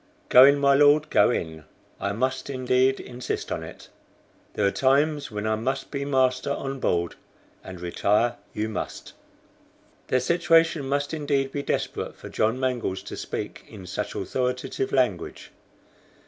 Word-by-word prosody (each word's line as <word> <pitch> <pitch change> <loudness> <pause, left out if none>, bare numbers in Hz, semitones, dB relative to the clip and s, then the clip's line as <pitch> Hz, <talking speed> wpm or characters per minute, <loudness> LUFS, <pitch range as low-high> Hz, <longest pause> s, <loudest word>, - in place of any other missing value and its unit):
"Go 130 +1 +9
in, 140 +1 +5
my 140 -1 +4
Lord, 145 +2 +4
go - - +5
in. 80 -9 -3 0.4
I 100 - -1
must 130 +6 -2
indeed 130 0 +1
insist 125 +1 -5
on - - -2
it. - - -11 0.7
There 105 - +1
are 100 - +3
times 145 +4 +2
when 105 0 -5
I 110 - +1
must 130 +5 -3
be 140 -1 -3
master 130 -1 +1
on 135 -1 -3
board, 85 -7 0 0.5
and 95 -2 -9
retire 105 +6 +1
you 105 +1 -2
must." 110 - -6 0.9
Their 130 - +2
situation 165 0 +2
must 145 +2 -1
indeed 140 -3 0
be 140 - -3
desperate - - -3
for - - -10
John 115 +4 0
Mangles 125 -7 -2
to - - -7
speak - - -6
in 100 -3 -11
such - - -4
authoritative 125 +1 -2
language. 125 -9 -1
130 Hz, 150 wpm, -25 LUFS, 110-140 Hz, 0.9 s, Go